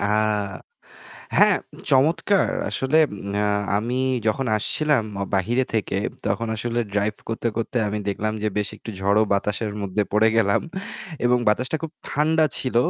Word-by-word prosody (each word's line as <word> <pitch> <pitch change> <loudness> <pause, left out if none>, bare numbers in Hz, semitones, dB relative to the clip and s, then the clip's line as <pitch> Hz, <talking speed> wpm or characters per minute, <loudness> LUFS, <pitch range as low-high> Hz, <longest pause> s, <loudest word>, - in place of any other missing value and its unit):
আ - - -1 1.3
হ্যাঁ। - - +6 0.3
চমৎকার। 165 +8 +3 0.2
আসলে 135 +4 +2 0.8
আমি 120 +4 -1 0.3
যখন 125 +4 +1
আসছিলাম 145 +3 +1 0.3
বাহিরে 120 +7 +1
থেকে 100 -3 0 0.3
তখন 115 +3 -1
আসলে 120 +1 -1
ড্রাইভ 105 +1 +1
করতে, 115 +1 -1
করতে 115 +2 -3
আমি 105 +1 -2
দেখলাম 105 +2 -1
যে 110 - +2
বেশ 105 -1 0
একটু 110 - -8
ঝড়ো 100 +3 +3
বাতাসের 105 +2 -1
মধ্যে 100 +1 0
পড়ে 110 +2 +5
গেলাম। 100 -3 +3 0.7
এবং 125 0 +4
বাতাসটা 125 +8 +1
খুব 160 -1 -5 0.2
ঠান্ডা 155 +2 +2
ছিল। 130 -3 -2
115 Hz, 135 wpm, -23 LUFS, 105-130 Hz, 1.3 s, হ্যাঁ